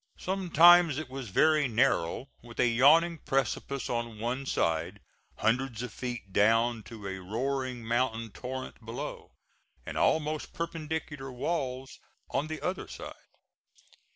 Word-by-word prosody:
Sometimes 175 -4 +5
it 150 -4 -5
was 130 -4 -6
very 155 +8 +4
narrow 115 -1 +1
with 120 -1 -13
a - - +5
yawning 155 +8 +5
precipice 135 0 -1
on 120 -2 -3
one 125 +5 -3
side, 85 +2 0 0.4
hundreds 120 0 0
of 125 - -6
feet 120 -6 -6
down 115 +3 +3
to 110 -4 -10
a 95 0 -4
roaring 125 +4 -3
mountain 115 -1 0
torrent 125 +6 -7
below, 115 +2 -7 0.5
and - - -4
almost 155 -1 +1
perpendicular 155 -4 -4
walls 130 -1 -3 0.3
on 145 - 0
the 155 0 -5
other 185 +1 -2
side. - - -8
130 Hz, 125 wpm, -29 LUFS, 115-150 Hz, 0.5 s, Sometimes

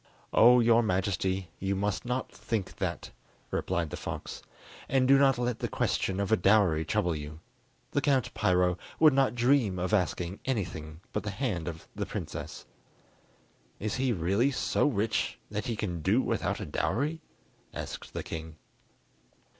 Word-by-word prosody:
"Oh, 125 +2 +7
your 115 0 +5
Majesty, 95 -3 -1
you 95 +1 -1
must 100 +1 -1
not 125 +1 -2
think 105 -5 -4
that," - - -3 0.4
replied 85 -4 -1
the - - -3
fox; - - -6 0.5
"and 130 -1 +3
do 135 0 +6
not 135 -3 +4
let 120 -1 -1
the - - -1
question 95 0 -1
of 100 +1 -1
a - - +7
dowry 95 -5 +4
trouble 90 -3 0
you. 75 +1 -7 0.5
The 145 - +1
Count 135 -3 +1
Piro 90 -1 +2 0.2
would 155 -3 +7
not 130 -4 +2
dream 120 -5 +3
of 90 +3 -2
asking 90 -1 0
anything 85 -10 -3
but 105 - 0
the 105 - -4
hand 100 - -2
of 80 -2 -6
the - - -3
princess." - - -6 1.1
"Is 110 +3 -2
he 130 -1 +1
really 100 +6 +2
so 140 +2 +1
rich 110 -5 0
that 105 +4 -3
he 115 - -1
can 90 -6 -3
do 100 +10 +3
without - - -1
a - - -4
dowry?" 150 +9 -1 0.5
asked - - -7
the - - -3
king. 80 0 -6
105 Hz, 160 wpm, -29 LUFS, 90-125 Hz, 1.1 s, Oh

